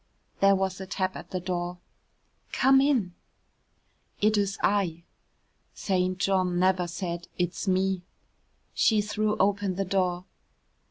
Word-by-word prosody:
There 195 0 +5
was 190 0 -2
a 190 - -7
tap 190 -1 -2
at - - -9
the 185 - -3
door. 175 0 -3 0.8
"Come 270 +1 +5
in." 250 -11 +1 1.1
"It's 205 -2 +1
I." 180 -5 +1 0.7
(St. 185 -1 0
John 185 -1 +1
never 185 -1 +2
said 175 0 -5
"It's 175 +3 -2
me.") 190 0 +1 0.7
She 220 -2 +3
threw 210 0 -1
open 200 -1 +1
the 195 +1 -1
door. 185 -1 0
190 Hz, 120 wpm, -27 LUFS, 180-200 Hz, 1.1 s, There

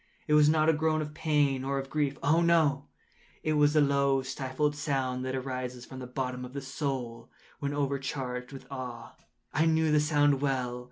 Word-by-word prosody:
It 150 - +1
was 150 0 +6
not 155 0 +3
a 160 - +5
groan 155 0 +1
of 150 0 -8
pain 145 -4 +1
or 135 +1 -1
of 135 0 -5
grief—oh, 150 +2 +1
no!—it 155 -1 -1
was 150 0 +4
the 155 - +5
low 140 -1 +2
stifled 135 +2 -2
sound 135 -4 -1
that 130 0 -2
arises 125 -2 -4
from 130 - -9
the 125 - -7
bottom 125 0 -3
of 125 0 -8
the 140 - -4
soul 130 -4 -4 0.3
when 140 -1 -2
overcharged 135 -3 -3
with 135 -2 -10
awe. 125 -3 -7 0.4
I 160 +3 +3
knew 160 -1 +3
the 150 - +5
sound 145 -2 +3
well. 130 -3 -1
140 Hz, 180 wpm, -29 LUFS, 130-150 Hz, 0.4 s, was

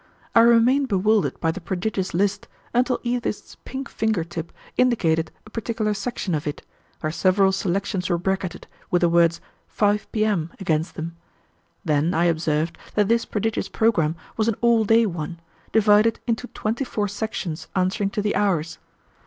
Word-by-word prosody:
I - - +6
remained 235 +4 +5
bewildered 210 0 +1
by 165 - +1
the 175 - -7
prodigious 190 +2 -2
list 200 +3 0 0.3
until 250 +1 +2
Edith's 240 -3 -3
pink 270 +1 -5
finger 220 -6 0
tip 165 0 -6 0.2
indicated 165 -11 +2 0.2
a 215 - -15
particular 220 -1 -1
section 205 -2 -3
of 150 -1 -2
it, 145 - -5 0.4
where 155 - -1
several 190 +3 +3
selections 190 0 -1
were 175 - +2
bracketed, 190 0 -2 0.2
with 175 - +2
the 170 - +5
words 170 0 +3 0.3
"5 210 0 0
P.M." 210 -7 0
against 160 -3 -1
them; 165 +1 -6 0.7
then 155 +2 +1
I 170 +2 +3
observed 160 -1 0 0.2
that 210 -1 +2
this 230 0 +2
prodigious 220 +1 -2
programme 170 -9 +2 0.2
was 220 0 +1
an 230 - +2
all 235 -2 +4
day 225 +2 +5
one, 170 -3 -4 0.3
divided 215 +1 +4
into 235 +1 -1
twenty 225 +4 -2
four 210 -5 -2
sections 205 -5 -4
answering 190 +2 +1
to 210 0 -2
the 210 - +1
hours. 185 -6 0
200 Hz, 160 wpm, -23 LUFS, 170-220 Hz, 0.7 s, I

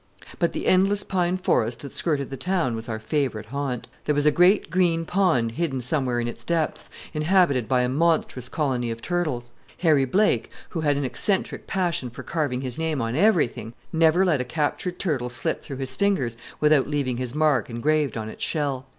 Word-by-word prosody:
But - - +1
the - - -4
endless 195 +2 +3
pine 180 -1 0
forest 120 -10 0
that 140 - -8
skirted 140 -5 -1
the - - -3
town 165 -3 0
was 115 +2 -6
our 110 - -2
favorite 110 -1 -2
haunt. 130 0 -4 0.2
There 150 - +1
was 145 0 +1
a 150 - +6
great 180 +2 +4
green 170 -2 +2
pond 165 -12 +2
hidden 140 0 -2
somewhere 125 -1 0
in 120 - -1
its 120 - -7
depths, 165 -2 -1 0.2
inhabited 150 - +2
by 125 -1 +2
a - - +1
monstrous 140 -3 0
colony 130 -6 -1
of 115 0 -6
turtles. 155 -9 -2 0.3
Harry 155 -6 +4
Blake, 200 +11 +2 0.2
who 165 - -3
had 145 -2 +2
an 140 - -1
eccentric 190 - -1
passion 175 -9 -1
for 125 +2 -9
carving 135 -3 -1
his 130 +1 -5
name 160 -3 -1
on 115 0 -2
everything, 155 - +2 0.2
never 165 +3 +4
let 155 -8 +2
a - - 0
captured 155 +6 -2
turtle 140 -11 -1
slip 125 - -2
through 135 - -7
his 130 -1 -5
fingers 170 - +1 0.2
without 150 -2 +4
leaving 140 -4 -1
his 125 +1 -4
mark 150 -4 +2
engraved 145 +4 0
on 110 -1 -4
its 110 - -7
shell. 140 -4 -2
145 Hz, 195 wpm, -24 LUFS, 125-170 Hz, 0.3 s, a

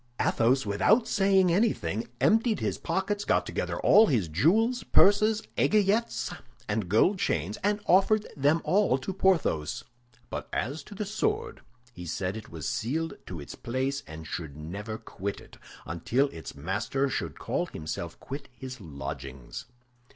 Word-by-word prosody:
Athos, 125 +3 +2
without 200 - +3
saying 195 -3 +3
anything, 115 - 0
emptied 225 0 +3
his - - -2
pockets, 205 +2 -1
got - - +2
together - - -3
all 220 +1 +7
his 110 - +1
jewels, 220 - +2
purses, 215 +2 +4 0.2
aiguillettes, 215 +2 +2 0.3
and 105 -3 -1
gold 175 - +3
chains, 85 - -1
and 205 +1 +2
offered 205 +3 +4
them 145 +3 +3
all 185 -4 +3
to 135 +8 -5
Porthos; 175 - +1 0.5
but - - -5
as 140 +8 -2
to 205 - -12
the 210 +1 -3
sword, 435 - -2 0.3
he 90 - -9
said 90 +4 -2
it 110 - -8
was 80 -3 -5
sealed 160 +8 -1
to 90 - -6
its 70 - -8
place 130 +3 -2
and 80 0 -9
should 80 -3 -6
never 100 +8 -5
quit 100 -2 -5
it - - -15 0.3
until 120 - 0
its 80 -8 -9
master 100 - -1
should 85 - -3 0.4
himself 75 -1 -5
quit 140 +1 -7
his 130 -3 -8
lodgings. 70 -5 -7
135 Hz, 145 wpm, -28 LUFS, -, 0.5 s, all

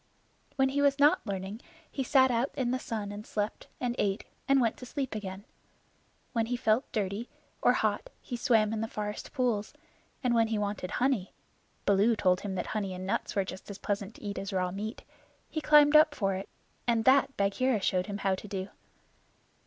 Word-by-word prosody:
When 270 -1 +3
he 285 +1 0
was 280 -1 +4
not 295 +5 +5
learning 195 +3 -4 0.3
he 270 - -2
sat 260 0 +4
out 240 +3 +1
in 245 -2 0
the 255 - 0
sun 215 -5 -4
and 205 +1 -7
slept, 210 0 -3
and 245 -1 -1
ate 195 0 0 0.2
and 275 0 +5
went 230 -3 +2
to 250 - -9
sleep 275 0 -3
again. 200 -1 -6 0.9
When 225 -2 +1
he 245 +1 -1
felt 235 +1 +1
dirty 210 +1 -2 0.3
or - - +5
hot - - 0
he 245 - -6
swam 225 -4 +3
in 220 - -2
the 225 - -1
forest 210 -1 -5
pools; 240 -6 -1 0.5
and 250 -1 +2
when 230 -1 +4
he 220 -1 -1
wanted 205 -3 -2
honey 250 -6 0 0.5
(Baloo 205 +3 +4
told 185 -3 +2
him 195 -2 -4
that 180 - -2
honey 200 -3 -2
and 185 +1 -6
nuts 195 - -2
were 195 -2 +2
just 185 +2 -8
as 200 - -6
pleasant 205 +1 -3
to - - -14
eat 200 -2 -3
as 195 +1 -5
raw 185 -1 0
meat) 210 +5 -5 0.5
he 310 - -2
climbed 295 0 +6
up 305 -1 +7
for 195 -3 0
it, 190 +1 -5 0.4
and 230 -2 +2
that 270 +1 +4
Bagheera 215 +4 +2
showed 185 -1 0
him 200 -1 -3
how 195 -1 +1
to 190 +2 -5
do. 190 -1 -4
215 Hz, 200 wpm, -30 LUFS, 200-255 Hz, 0.9 s, up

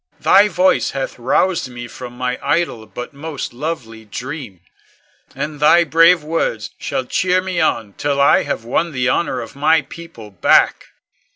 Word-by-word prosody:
Thy 205 +1 +5
voice 185 -1 +2
hath 135 -2 -4
roused 160 +6 +1
me 120 -1 -8
from 125 0 -9
my 125 0 -2
idle 140 -7 -1
but 125 +4 -8
most 145 -1 -6
lovely 120 -5 -5
dream, 120 - -7 0.7
and 150 -1 -5
thy 160 +3 +5
brave 165 +2 +4
words 150 -8 -2
shall 130 - -3
cheer 180 +7 +1
me 185 -2 -3
on 105 -3 0
till 140 +4 -2
I 140 - +5
have 115 - -4
won 165 +7 -1
the 125 -1 0
honor 130 -4 0
of 115 - -10
my 155 +2 +3
people 165 -11 -12
back. 90 - +3
140 Hz, 160 wpm, -18 LUFS, 120-165 Hz, 0.7 s, Thy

